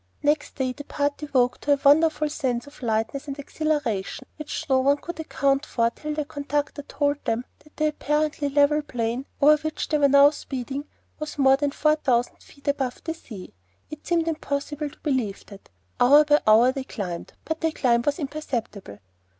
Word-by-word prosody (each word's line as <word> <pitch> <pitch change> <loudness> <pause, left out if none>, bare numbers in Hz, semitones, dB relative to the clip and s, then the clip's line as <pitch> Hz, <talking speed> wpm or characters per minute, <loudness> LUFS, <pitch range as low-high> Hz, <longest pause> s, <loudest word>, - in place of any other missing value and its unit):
Next 295 +1 +1
day 260 -2 -1
the 290 - -9
party 285 +1 -2
woke 250 -2 +2
to 290 - +2
a 285 - 0
wonderful 305 +1 +5
sense 255 -5 -2
of 285 - -15
lightness 225 +5 -1
and 275 0 -5
exhilaration 290 -9 -2
which 305 +1 -5
no 265 -2 +3
one 280 +2 +3
could 340 +2 -8
account 275 -3 0
for 230 -1 0
till 300 +4 -5
the 300 -1 -2
conductor 290 0 -3
told 285 0 -1
them 235 +2 -1
that 300 - -23
the 310 0 +2
apparently 300 -1 -1
level 290 +2 +3
plain 245 -1 -3
over 300 +2 +7
which 310 0 -3
they 300 - +2
were 280 0 +6
speeding 270 -1 -5 0.3
was 305 -1 -6
more 270 -1 +5
than 290 0 0
four 305 +2 +2
thousand 245 -5 0
feet 280 +1 -19
above 270 -3 -1
the 325 - -3
sea. 215 - -11 0.4
It 305 - -9
seemed 335 -1 +1
impossible 295 -1 -3
to 285 - -19
believe 255 -9 -1
it. 200 -1 -13 0.3
Hour 290 +5 +7
by 295 0 +4
hour 225 +4 +6
they 270 0 -4
climbed; 180 -9 -6
but 320 0 -3
the 325 -1 +1
climb 240 -6 +2
was 290 +4 0
imperceptible. 255 - -5
285 Hz, 185 wpm, -24 LUFS, 255-300 Hz, 0.4 s, over